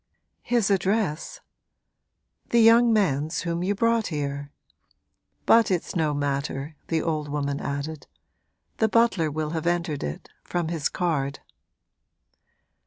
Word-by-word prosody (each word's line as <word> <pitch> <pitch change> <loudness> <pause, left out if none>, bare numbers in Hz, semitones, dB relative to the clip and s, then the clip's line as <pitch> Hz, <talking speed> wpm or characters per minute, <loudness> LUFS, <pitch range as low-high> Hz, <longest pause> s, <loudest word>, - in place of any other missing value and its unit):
'His 235 -5 +1
address?' 190 -4 0 1.1
'The 235 - +3
young 230 +1 +6
man's 160 -7 +1
whom 170 -1 -2
you 195 +3 0
brought 230 +1 +2
here. 145 -2 -4 0.9
But 230 0 +5
it's 180 -1 -2
no 160 -3 +1
matter,' 140 +1 -2
the 160 -2 0
old 155 -3 -2
woman 140 -1 -2
added; 140 +2 -5 0.7
'the 220 - +2
butler 220 -8 +3
will 155 +1 -3
have 160 0 -2
entered 170 -4 -1
it 75 +1 -5 0.2
from 175 -2 -2
his 160 -3 -1
card.' 145 -6 -1
160 Hz, 120 wpm, -25 LUFS, 145-200 Hz, 1.1 s, young